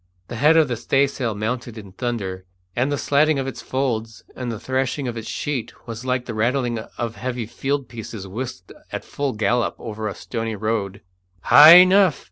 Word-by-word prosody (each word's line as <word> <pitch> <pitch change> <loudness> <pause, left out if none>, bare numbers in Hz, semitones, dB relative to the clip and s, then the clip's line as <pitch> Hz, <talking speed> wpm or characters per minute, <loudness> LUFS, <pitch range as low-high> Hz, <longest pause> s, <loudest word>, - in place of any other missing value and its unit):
The 120 - -5
head 150 +6 +5
of 160 -2 +5
the 120 -3 -3
staysail 135 -3 0
mounted 115 +2 -4
in 100 -3 -10
thunder, 100 -5 -4 0.3
and 130 +4 0
the 145 - 0
slatting 150 +2 +2
of 135 - -2
its 135 - -6
folds 115 -4 -3
and 125 -2 -4
the 110 - -6
thrashing 130 +1 -2
of 120 - -4
its 115 -1 -6
sheet 135 -6 -4
was 115 0 -7
like 125 -1 -1
the 115 - -5
rattling 120 +1 0 0.2
of 115 -1 -4
heavy 125 -2 -3
field 135 +4 -3
pieces 110 -4 -8
whisked 110 -2 -7 0.2
at - - -5
full 140 -2 -3
gallop 115 +2 0
over 110 -1 -5
a 100 - -5
stony 115 -2 -4
road. 105 -2 -2 0.4
"High 155 +3 +10
enough!" 185 -1 +6
120 Hz, 185 wpm, -22 LUFS, 110-135 Hz, 0.4 s, High